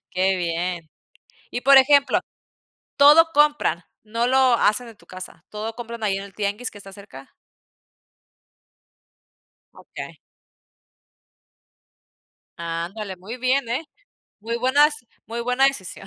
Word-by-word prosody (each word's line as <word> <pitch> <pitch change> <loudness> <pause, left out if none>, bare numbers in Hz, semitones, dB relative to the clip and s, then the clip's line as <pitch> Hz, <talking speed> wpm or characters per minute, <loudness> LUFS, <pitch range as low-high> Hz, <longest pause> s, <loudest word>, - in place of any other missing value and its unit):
Qué 190 +1 +1
bien. 170 -1 -3 0.6
Y 245 - -4
por 275 +1 +6
ejemplo, 280 +1 +4 0.8
¿todo 300 +4 +7
compran? 295 - +2 0.2
¿No 230 +3 -1
lo 260 -1 +4
hacen 230 +2 +1
en 225 - -14
tu - - -23
casa? 185 0 -11
¿Todo 220 +1 -5
compran 235 -1 -8
ahí 195 -2 0
en 195 - -6
el 200 - -14
tianguis 210 +4 -3
que 205 - -13
está 195 -1 -12
cerca? 160 -10 -13 2.4
Okey. - - -10 2.4
Ándale, 170 +4 -5
muy 205 +8 -9
bien, 255 0 0
eh, 255 +7 -2 0.6
muy 230 +2 -3
buenas 285 +5 +3 0.3
muy 230 +2 -5
buena 250 +3 +2
decisión. 195 -6 -4
225 Hz, 120 wpm, -22 LUFS, 190-260 Hz, 2.4 s, todo